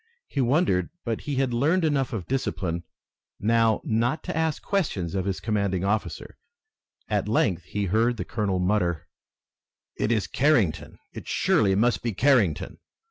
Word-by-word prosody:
He 140 Hz, -, -1 dB
wondered, 125 Hz, -, +2 dB, 0.2 s
but 115 Hz, -2 st, -2 dB
he 140 Hz, -, -1 dB
had 130 Hz, -2 st, 0 dB
learned 160 Hz, +9 st, +2 dB
enough 140 Hz, -4 st, +1 dB
of 100 Hz, -7 st, -4 dB
discipline 90 Hz, -10 st, -2 dB, 0.5 s
now 115 Hz, +1 st, +2 dB
not 120 Hz, +7 st, 0 dB
to -, -, -4 dB
ask 160 Hz, -2 st, -1 dB
questions 125 Hz, -, -1 dB
of 95 Hz, -1 st, -1 dB
his 95 Hz, -2 st, -2 dB
commanding 100 Hz, -4 st, -1 dB
officer. 105 Hz, +2 st, -3 dB, 0.7 s
At 105 Hz, -2 st, -1 dB
length 95 Hz, -5 st, +1 dB
he 105 Hz, +1 st, -2 dB
heard 115 Hz, +5 st, +1 dB
the -, -, -4 dB
colonel 105 Hz, -4 st, -1 dB
mutter: 90 Hz, -3 st, 0 dB, 0.9 s
"It 110 Hz, -, -1 dB
is 110 Hz, -3 st, +1 dB
Carrington! 125 Hz, -, +1 dB, 0.2 s
It -, -, -9 dB
surely 95 Hz, -3 st, +2 dB
must 120 Hz, +4 st, +2 dB
be 115 Hz, -2 st, -2 dB
Carrington!" 115 Hz, -, +2 dB
110 Hz, 150 wpm, -25 LUFS, 95-130 Hz, 0.9 s, wondered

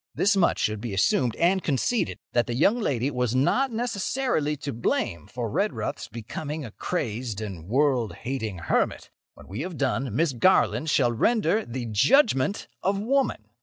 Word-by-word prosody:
This 200 Hz, +1 st, +3 dB
much 185 Hz, -3 st, +3 dB
should 105 Hz, -1 st, -1 dB
be 110 Hz, -4 st, -4 dB
assumed 115 Hz, +4 st, +2 dB
and 185 Hz, +3 st, +2 dB
conceded—that 140 Hz, -, -1 dB
the 120 Hz, -, -2 dB
young 200 Hz, -, +3 dB
lady 135 Hz, -, 0 dB
was 125 Hz, -2 st, -1 dB
not 255 Hz, -, +2 dB
necessarily 225 Hz, -, -1 dB
to 140 Hz, 0 st, -5 dB
blame 85 Hz, -8 st, -1 dB
for 120 Hz, -1 st, -4 dB
Redruth's 200 Hz, -, -2 dB
becoming 140 Hz, +7 st, -6 dB
a 110 Hz, -, -8 dB
crazed 115 Hz, -, -3 dB
and 95 Hz, -6 st, -7 dB
world 130 Hz, -2 st, +1 dB
hating 115 Hz, -6 st, -4 dB
hermit. -, -, 0 dB, 0.2 s
When -, -, -15 dB
we 100 Hz, +8 st, -5 dB
have 175 Hz, -1 st, -5 dB
done, 130 Hz, -4 st, -1 dB
Miss 155 Hz, 0 st, +2 dB
Garland 160 Hz, +2 st, +3 dB
shall 125 Hz, -4 st, +3 dB
render 220 Hz, -, +2 dB
the 120 Hz, +1 st, -4 dB
JUDGEMENT 195 Hz, -, +3 dB
OF 195 Hz, +1 st, +1 dB
WOMAN. 255 Hz, -, 0 dB
135 Hz, 160 wpm, -26 LUFS, 115-190 Hz, 0.2 s, This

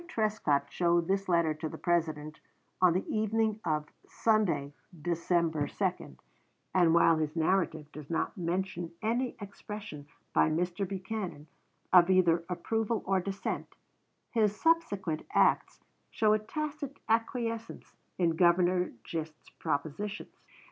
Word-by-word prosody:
Trescott 210 Hz, -, +1 dB
showed 170 Hz, -1 st, +2 dB
this 195 Hz, 0 st, 0 dB
letter 170 Hz, -3 st, +3 dB
to 155 Hz, +1 st, -5 dB
the -, -, -8 dB
President 155 Hz, -3 st, -1 dB, 0.4 s
on 180 Hz, -2 st, +6 dB
the 185 Hz, -, -1 dB
evening 220 Hz, 0 st, 0 dB
of 150 Hz, -2 st, 0 dB, 0.2 s
Sunday, 210 Hz, -11 st, +1 dB, 0.3 s
December 170 Hz, -2 st, 0 dB
2, 65 Hz, -, -3 dB, 0.6 s
and 175 Hz, -3 st, +4 dB
while 165 Hz, -1 st, +5 dB
his 155 Hz, 0 st, -2 dB
narrative 160 Hz, -3 st, 0 dB
does 150 Hz, -2 st, -10 dB
not 165 Hz, -, -1 dB
mention 175 Hz, -1 st, -2 dB
any 240 Hz, +3 st, 0 dB
expression 205 Hz, -6 st, -8 dB, 0.3 s
by -, -, +4 dB
Mr. 175 Hz, +4 st, -1 dB
Buchanan 190 Hz, -4 st, -5 dB, 0.5 s
of 180 Hz, -1 st, +8 dB
either 175 Hz, -3 st, +4 dB
approval 225 Hz, +5 st, -1 dB
or 190 Hz, 0 st, +2 dB
dissent, 195 Hz, +1 st, -4 dB, 0.6 s
his 210 Hz, -3 st, +1 dB
subsequent 205 Hz, -, +1 dB
acts -, -, +3 dB, 0.3 s
show 215 Hz, -1 st, +3 dB
a 215 Hz, -, +3 dB
tacit 290 Hz, +4 st, -5 dB
acquiescence 230 Hz, 0 st, -2 dB, 0.2 s
in 175 Hz, -2 st, +3 dB
Governor 180 Hz, +1 st, +3 dB
Gist's 160 Hz, -2 st, -6 dB
propositions. 160 Hz, +9 st, -4 dB
180 Hz, 120 wpm, -30 LUFS, 165-215 Hz, 0.6 s, of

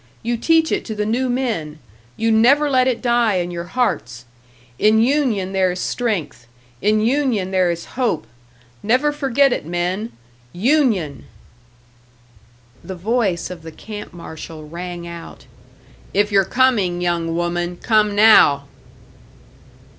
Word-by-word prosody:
You 235 Hz, +1 st, -1 dB
teach 320 Hz, +6 st, +2 dB
it -, -, 0 dB
to 220 Hz, -, -5 dB
the 210 Hz, 0 st, -2 dB
new 250 Hz, +4 st, 0 dB
men, 225 Hz, -12 st, -2 dB, 0.4 s
you 225 Hz, 0 st, +1 dB
never 275 Hz, +7 st, +4 dB
let 255 Hz, -1 st, +3 dB
it 250 Hz, -1 st, -1 dB
die 240 Hz, -4 st, +2 dB
in 175 Hz, -1 st, -2 dB
your 170 Hz, 0 st, -5 dB
hearts! 125 Hz, -, -2 dB, 0.5 s
In 215 Hz, +1 st, +4 dB
union 235 Hz, -7 st, +1 dB
there 190 Hz, -1 st, +2 dB
is 180 Hz, -, -5 dB
strength, 195 Hz, -, -3 dB, 0.3 s
in 215 Hz, +2 st, +2 dB
union 235 Hz, -6 st, 0 dB
there 185 Hz, -2 st, +2 dB
is 170 Hz, 0 st, -3 dB
hope! 235 Hz, -, -1 dB, 0.6 s
Never 255 Hz, +7 st, +2 dB
forget 275 Hz, -2 st, +2 dB
it, -, -, -3 dB
men 175 Hz, +7 st, -3 dB, 0.4 s
Union!" 210 Hz, -, +1 dB, 1.6 s
The 190 Hz, -, -7 dB
voice 195 Hz, -2 st, -1 dB
of 175 Hz, -2 st, -8 dB
the 160 Hz, 0 st, -9 dB
camp 210 Hz, +5 st, -9 dB
marshal 160 Hz, -2 st, -10 dB
rang 175 Hz, +1 st, -7 dB
out. 170 Hz, -1 st, -10 dB, 0.7 s
"If 205 Hz, +1 st, +2 dB
you're 195 Hz, -1 st, +4 dB
coming, 210 Hz, -7 st, +1 dB
young 170 Hz, -2 st, -1 dB
woman, 175 Hz, +1 st, -2 dB
come 210 Hz, -1 st, +2 dB
now!" 205 Hz, -10 st, +6 dB
205 Hz, 135 wpm, -20 LUFS, 175-245 Hz, 1.6 s, now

